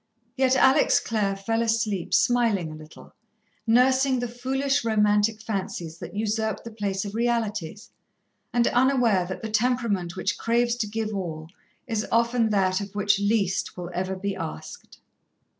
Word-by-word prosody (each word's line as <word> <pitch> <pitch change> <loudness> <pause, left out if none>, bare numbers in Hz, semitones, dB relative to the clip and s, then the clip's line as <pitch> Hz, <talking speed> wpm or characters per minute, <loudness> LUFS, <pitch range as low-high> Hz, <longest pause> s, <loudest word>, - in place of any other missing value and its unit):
Yet 265 -1 +3
Alex 265 +2 +4
Clare 205 -3 -1
fell 225 +4 -1
asleep 220 -5 -1
smiling 225 -9 +2
a - - -8
little, 155 0 -14 0.5
nursing 260 +3 +4
the 245 0 -2
foolish, 270 +4 -1
romantic 210 -1 +2
fancies 180 -6 -4
that 175 +2 -8
usurped 220 0 -1
the 230 - -8
place 200 -2 -3
of 200 - -6
realities, 225 -3 -2 0.6
and 240 -1 +2
unaware 245 -8 +2
that 190 - -6
the 220 - -4
temperament 215 -6 0
which 190 +2 -2
craves 235 +1 +1
to 220 - -1
give 220 0 -3
all, 165 -5 -5 0.4
is 220 -2 -2
often 235 0 +2
that 190 -2 +1
of 200 0 -8
which 205 -1 +2
least 200 -4 0
will 175 0 -6
ever 185 +1 -2
be 195 +1 -3
asked. 75 0 -8
215 Hz, 150 wpm, -25 LUFS, 195-235 Hz, 0.6 s, Alex